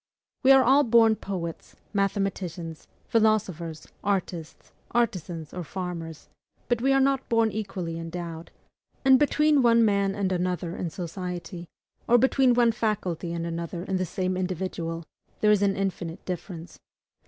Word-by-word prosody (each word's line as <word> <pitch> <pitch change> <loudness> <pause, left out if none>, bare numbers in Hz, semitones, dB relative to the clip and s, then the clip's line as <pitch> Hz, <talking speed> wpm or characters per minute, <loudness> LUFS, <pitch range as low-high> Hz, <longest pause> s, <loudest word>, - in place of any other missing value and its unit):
We 265 - +6
are 270 -1 +8
all 270 +4 +5
born 225 -2 +5
poets, 175 -6 -6 0.2
mathematicians, 195 -5 -2 0.2
philosophers, 185 -8 0 0.2
artists, 180 -5 -3 0.2
artisans, 180 -9 -1
or 180 - -4
farmers, 170 -2 -6 0.4
but 240 -2 +1
we 270 +2 +3
are 270 - +4
not 270 0 +1
born 230 -1 +3
equally 185 -6 -4
endowed; 165 0 -6 0.6
and 265 -1 +7
between 300 0 +3
one 230 -1 +5
man 200 -2 +1
and 195 -2 -1
another 180 -1 -1
in 175 - -3
society, 175 0 -6 0.4
or 240 - +6
between 260 0 +4
one 240 -1 +4
faculty 190 -7 -2
and 170 0 -3
another 170 +1 -4
in 190 0 -1
the 185 - 0
same 185 +2 -2
individual, 180 -2 -3 0.4
there 210 - +5
is 210 -1 +4
an 200 -1 +2
infinite 180 -3 -3
difference. 175 -1 -6
190 Hz, 140 wpm, -26 LUFS, 170-225 Hz, 0.6 s, are